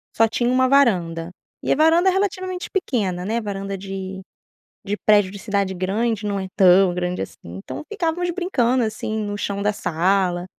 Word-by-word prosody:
só 225 - +4
tinha 240 +2 0
uma 255 +1 +3
varanda 175 -12 +2 0.3
e - - -1
a - - +4
varanda 325 +5 +4
é - - +3
relativamente 370 -2 -2
pequena, 200 - -1
né, 225 +3 -1
varanda 195 -2 -4
de 190 0 -6 0.7
de 205 +1 -1
prédio 205 -3 +4
de 200 - -8
cidade 200 -3 -1
grande 210 +4 -1
não 200 -1 -1
é 190 - -4
tão 185 -1 +5
grande 180 - -2
assim, 95 - -9
então 90 - -7
ficávamos 350 -2 -1
brincando, 260 -10 +1
assim, 215 0 -3
no 205 0 -3
chão 200 -1 -3
da 210 +1 +2
sala 180 -1 0
205 Hz, 175 wpm, -22 LUFS, 190-255 Hz, 0.7 s, tão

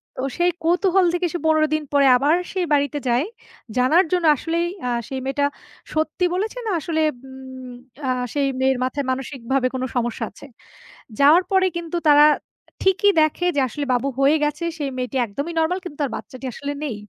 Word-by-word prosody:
তো - - -5 0.2
সেই 350 0 +3
কৌতূহল 360 +2 +3
থেকে 355 0 0
সে - - -1
১৫ 310 -1 +3
দিন 310 0 0
পর 285 -1 +3 0.2
আবার 290 +5 +3 0.2
সেই 370 -2 0
বাড়িতে 285 0 +1
যায়। 245 +4 +2 0.5
জানার 285 +9 +4
জন্য 360 -2 +1
আসলেই 335 +4 -1 0.2
আ - - 0 0.2
সেই 265 - -3
মেয়েটা 280 +1 0 0.5
সত্যি 315 +3 0
বলেছে 420 +6 -2
না, - - 0
আসলেই 315 0 0 0.2
উম 260 -1 -10 0.3
আ - - 0 0.2
সেই 285 -1 +1
মেয়ের 265 0 +2
মাথায় 275 +2 -2
মানসিকভাবে 265 0 -1
কোন 260 0 -3
সমস্যা 240 -1 -1
আছে? 200 - -14 0.7
যাওয়ার 300 +6 +6
পরে 380 -1 +4
কিন্তু 340 0 -4
তারা 295 0 +7 0.6
ঠিকই 385 +2 +4
দেখে 310 +3 +1
যে - - +2
আসলে, 285 +6 -4
বাবু 250 +2 0
হয়ে 280 +3 +4
গেছে। 295 +3 -2
সেই 290 -3 -2
মেয়েটি 255 +1 -3
একদমই 280 +10 -5
নরমাল, 340 +4 +1
কিন্তু 310 -6 -9
তার 280 - -1
বাচ্চাটি 260 +1 -8
আসলে 285 0 -4
নেই। 255 -7 -3
290 Hz, 180 wpm, -22 LUFS, 265-340 Hz, 0.7 s, তারা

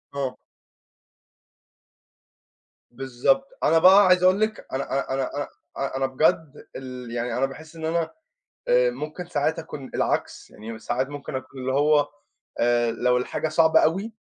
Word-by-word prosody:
آه. 135 -2 -3 2.5
بالضبط، 135 - 0 0.2
أنا 165 +2 +4
بقى 190 +4 +7
عايز 180 0 +4
أقول 185 +2 +5
لِك، 215 0 -1
أنا 135 +1 -1
أنا 135 -1 -1
أنا 135 0 -2
أنا 145 0 -3 0.3
أنا 135 -1 -3
أنا 135 - +1
بجد 145 +2 0
ال 125 -2 -8
يعني 120 0 -2
أنا 135 - +2
باحس 155 +4 -10
إن 160 -1 -6
أنا 165 0 -1 0.6
آآ، - - +4
ممكن 155 +4 -6
ساعات 160 0 -1
أكون 150 -5 -8
العكس، - - -2
يعني 110 +1 -9
ساعات 125 +4 -2
ممكن 145 -2 -7
أكون 130 +1 -7
اللي 130 +1 -2
هو، 145 +1 +3 0.5
آآ 120 0 +2
لو 125 +2 +1
الحاجة 125 +5 -2
صعبة 160 -1 +4
أوي، 195 +8 0
140 Hz, 150 wpm, -24 LUFS, 130-165 Hz, 2.5 s, بقى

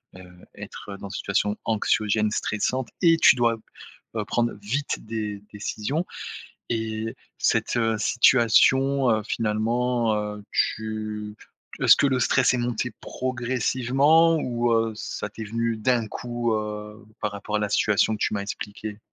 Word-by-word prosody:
heu, 90 -1 -12 0.2
être 100 - -8
dans 100 - -8
une - - -9
situation 105 +1 -1
anxiogène, 110 -1 +1
stressante 120 +4 -1
et 165 -2 +5
tu 140 - +7
dois, 120 -2 +2 0.6
heu, 105 -2 -2
prendre 120 +2 0
vite 135 +8 -2
des 105 -2 -4
décisions 110 - -3 0.6
et 110 -1 -3 0.2
cette 120 - +1 0.2
situation, 130 +3 +4
heu, 110 -1 +1
finalement, 115 +2 0
heu, 105 -1 -4
tu 110 -1 -2 0.5
est-ce - - +8
que - - +2
le 130 -1 +1
stress 130 +1 +3
est 125 - +1
monté 120 0 -2
progressivement 130 +6 +2
ou 120 -4 0
heu, 115 -1 +1
ça 105 - -5
t'est 110 +1 -8
venu 115 +2 -1
d'un 115 0 +1
coup, 120 0 -2
heu, 105 +1 -5 0.2
par 105 -1 -1
rapport 105 +1 -4
à - - -2
la 105 - -1
situation 105 +1 +2
que - - -10
tu - - 0
m'as 100 - -1
expliquée? 105 +1 -6
115 Hz, 145 wpm, -25 LUFS, 105-125 Hz, 0.6 s, est-ce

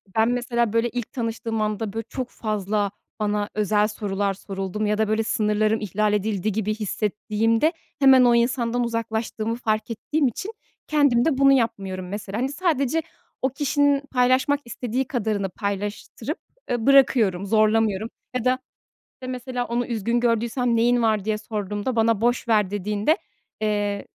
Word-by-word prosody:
Ben, 220 +1 +4
mesela, 240 -2 0
böyle, 230 +1 +2
ilk 245 -2 -5
tanıştığım 225 -2 -3
anda, 215 -1 -2
böyle, 225 0 -3
çok 255 -2 -4
fazla 210 -2 -1 0.3
bana 210 -1 0
özel 210 0 +2
sorular 200 -2 -2
soruldu 195 0 -5
mu 215 - +1
ya 210 0 +1
da 220 0 +1
böyle, 220 +1 +1
sınırlarım 215 0 +1
ihlal 210 +1 0
edildi 210 0 0
gibi 215 +1 -1
hissettiğimde 220 - 0 0.3
hemen 265 -2 +7
o 240 -1 +5
insandan 235 0 +1
uzaklaştığımı 230 -1 -2
fark 220 -1 -1
ettiğim 285 +6 0
için 375 - -4 0.4
kendim 285 -6 +3
de 310 -5 +2
bunu 275 0 +6
yapmıyorum 195 -7 -1
mesela. 205 0 -5
Hani, 255 +3 0
sadece 310 -2 0 0.4
o 260 - +2
kişinin 285 +1 +2
paylaşmak 260 +3 +3
istediği 245 +2 -3
kadarını 215 -7 -1
paylaştırıp, 200 +1 -4 0.3
eee, 240 -2 -1
bırakıyorum, 240 -9 +4
zorlamıyorum 215 0 +2 0.3
ya 250 -1 -1
da, 255 +1 +2 0.5
işte, 255 - -10
mesela, 250 -1 -3
onu 240 +1 -1
üzgün 235 0 0
gördüysem, 235 +1 +1
“Neyin 240 +1 +3
var?” 215 -3 +1
diye 215 -1 0
sorduğumda 210 +2 -3
bana, 225 -2 +2
“Boş 240 +1 +1
ver.” 210 -4 +3
dediğinde, 210 - +1 0.4
eee, 205 -1 -1
225 Hz, 150 wpm, -24 LUFS, 210-245 Hz, 0.5 s, hemen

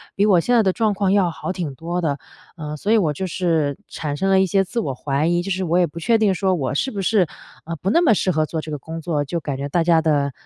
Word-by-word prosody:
比 200 - +3
我 195 -4 +5
现 245 +8 +1
在 230 - +5
的 190 - +3
状 215 +1 +1
况 195 -1 0
要 195 -3 +3
好 165 +3 -5
挺 170 -7 -4
多 170 +4 -3
的。 150 -5 -1 0.4
呃， 150 -3 -6
所 200 - -4
以 - - +5
我 170 -8 +2
就 185 +6 -4
是 160 -5 0
产 150 -2 -4
生 195 +6 0
了 190 0 +5
一 190 - +4
些 195 +1 +2
自 195 +5 -3
我 140 - -2
怀 140 +3 -1
疑， 175 0 +2
就 195 +2 -4
是 185 0 -1
我 170 +1 +1
也 180 - +4
不 170 +1 -8
确 225 +7 +3
定 215 -3 +2
说 190 0 +1
我 135 -7 -2
是 265 - -1
不 200 - -4
是， 195 -2 +2 0.4
呃， 165 +1 -4
不 180 +4 -3
那 285 - +4
么 290 -10 +5
适 185 -2 +1
合 155 -1 +1
做 160 +1 -4
这 155 - -8
个 150 - -3
工 160 +4 -7
作， 150 -3 -1
就 165 +4 -3
感 140 -3 -4
觉 140 +1 -3
大 170 +4 +1
家 165 -1 +4
的， 145 -3 +1
175 Hz, 320 characters per minute, -21 LUFS, 155-195 Hz, 0.4 s, 我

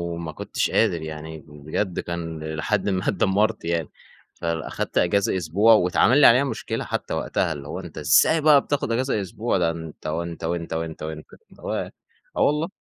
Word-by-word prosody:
ما 85 -1 -5
كنتش - - -2
قادر 85 - +2
يعني 80 0 -7
بجد 75 +6 -3
كان 80 -2 -5
لحد 100 +6 0
ما 95 -1 -1
اتدمرت 105 0 +1
يعني. 85 -3 -1 0.4
فأخدت 85 -2 -3
أجازة 95 +1 +2
أسبوع 95 +7 +4
واتعمل 105 +6 +4
لي - - +9
عليها 125 +4 +6
مشكلة 130 -6 -3
حتى - - -4
وقتها، 80 - -1
اللي 70 -1 -9
هو 90 - -5
أنتَ 85 -4 -10
إزاي 75 - +4
بقى 150 -2 +6
بتاخد 145 -4 -2
أجازة 125 -2 0
أسبوع؟ 100 +4 -2
ده 85 -2 +2
أنتَ، 80 -2 -8
وأنتَ 85 +2 -4
وأنتَ، 85 0 -3
وأنتَ 80 -1 -4
اللي 80 0 -6 0.4
هو - - -3 0.6
آه - - +1
والله. 150 +4 +2
85 Hz, 170 wpm, -23 LUFS, 80-105 Hz, 0.6 s, لي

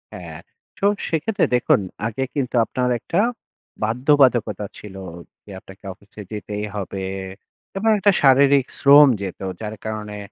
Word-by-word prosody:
হ্যাঁ, - - -9 0.4
তো 200 - -2 0.2
সেক্ষেত্রে 195 +6 0
দেখুন 125 - +3 0.3
আগে 115 +4 -3
কিন্তু 130 -3 -2
আপনার 125 +1 -2
একটা 170 - -2 0.6
বাধ্যবাধকতা 120 -3 +2
ছিল, 100 -2 -11 0.5
যে 105 - -12
আপনাকে 95 +2 -16
অফিসে 100 +1 -14
যেতেই 105 0 -5
হবে, 95 -1 -5 0.7
এবং 220 +3 +1
একটা 205 0 +4
শারীরিক 140 0 +5
শ্রম 145 +1 +8
যেত 95 -3 -6 0.2
যার 110 0 -5
কারণে 105 -1 -5
125 Hz, 130 wpm, -21 LUFS, 105-140 Hz, 0.7 s, শ্রম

